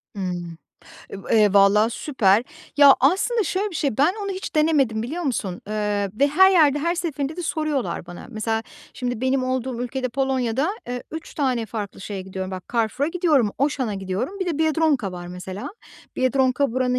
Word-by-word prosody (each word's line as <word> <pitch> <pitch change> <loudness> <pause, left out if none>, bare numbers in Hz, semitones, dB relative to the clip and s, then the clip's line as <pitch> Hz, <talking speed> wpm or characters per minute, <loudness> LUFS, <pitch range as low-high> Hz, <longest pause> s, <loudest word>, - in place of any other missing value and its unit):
Hımm, 175 -4 -4 0.5
e - - -6
va - - -9
eee, 210 -3 +5
valla, 200 +3 +5
süper. 225 -6 +2 0.3
Ya, 285 -2 +8
aslında, 390 - +2
şöyle 400 +2 -1
bir - - -10
şey, 280 -8 -1
ben 305 +7 +4
onu 400 - -3
hiç 375 -1 -5
denemedim 290 -8 +2
biliyor 310 +10 -4
musun? 220 - -2
Eee, 210 -2 -1
ve 280 - +5
her 380 +6 +6
yerde 300 -6 +4
her 335 +4 0
seferinde 315 -3 -3
de 355 - -4
soruyorlar 310 - -2
bana. 175 0 -10
Mesela, 225 0 -2 0.3
şimdi 245 -2 -3
benim 260 0 +1
olduğum 255 -1 -2
ülkede, 255 +1 -3
Polonya'da, 265 +2 0 0.2
eee, 245 0 -4
3 320 0 -8
tane 255 -6 0
farklı 205 -3 -6
şeye 195 -1 -5
gidiyorum. 190 0 -6
Bak, 185 -1 -6
Carrefour'a 235 +5 0
gidiyorum, 320 - +2
Auchan'a 265 -6 0
gidiyorum. 195 - -4
Bir 375 - -1
de 330 -4 -2
Biedronka 310 - +1
var, 175 -1 -7
mesela. 180 +2 -7 0.5
Biedronka 260 0 +2
buranın 250 0 +1
255 Hz, 175 wpm, -23 LUFS, 210-300 Hz, 0.5 s, Ya